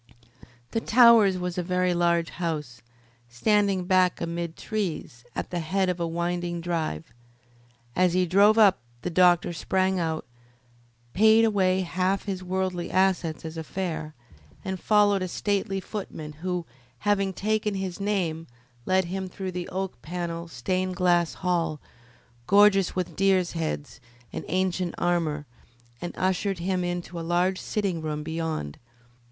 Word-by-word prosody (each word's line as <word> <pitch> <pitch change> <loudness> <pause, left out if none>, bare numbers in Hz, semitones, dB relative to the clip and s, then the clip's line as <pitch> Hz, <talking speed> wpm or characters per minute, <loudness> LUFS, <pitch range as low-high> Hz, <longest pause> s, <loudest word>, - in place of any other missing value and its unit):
The 225 - -1
Towers 230 -6 +6
was 180 0 -3
a - - +1
very 180 0 +1
large 170 -1 +1
house, 150 -8 -4 0.5
standing 195 - +1
back 185 -1 +3
amid 170 0 -4
trees, 175 - -4
at - - -4
the 175 - -1
head 185 +3 0
of 180 -1 -2
a 170 - 0
winding 175 +1 -2
drive. 160 - -3 0.8
As 180 -1 +3
he 185 0 +3
drove 200 +5 +5
up 200 - +6 0.2
the 180 - -2
doctor 175 0 +4
sprang 190 +2 0
out, 160 -2 -2 0.9
paid 220 +3 +6
away 190 -3 +2
half 185 +2 0
his 190 -3 -4
worldly 185 -1 -2
assets 185 -4 +1
as 160 0 -6
a 160 - -4
fare, 160 -4 -4 0.5
and 190 -1 -3
followed 205 -1 +3
a 185 - -1
stately 195 +1 -1
footman 185 -6 -6
who, 180 -1 -2 0.4
having 200 -2 +1
taken 210 +1 -1
his 190 -2 -4
name, 180 -6 -1 0.4
led 185 0 +3
him 190 +2 -4
through 190 0 -5
the 180 -1 -5
oak 190 -8 -4
panelled, 170 0 -5
stained 185 +7 -2
glass 175 -2 +2
hall, 170 -4 -1 0.7
gorgeous 200 -1 +5
with 185 -2 -3
deers' 190 -2 +2
heads 160 -3 -4 0.3
and - - -5
ancient 185 -1 -1
armour, 165 -4 0 0.6
and 175 - -4
ushered 190 +1 0
him 180 +1 -1
into 175 -1 -4
a - - -4
large 175 +3 +1
sitting 195 -6 -2
room 150 -1 -3
beyond. 160 - -4
180 Hz, 145 wpm, -26 LUFS, 170-190 Hz, 0.9 s, Towers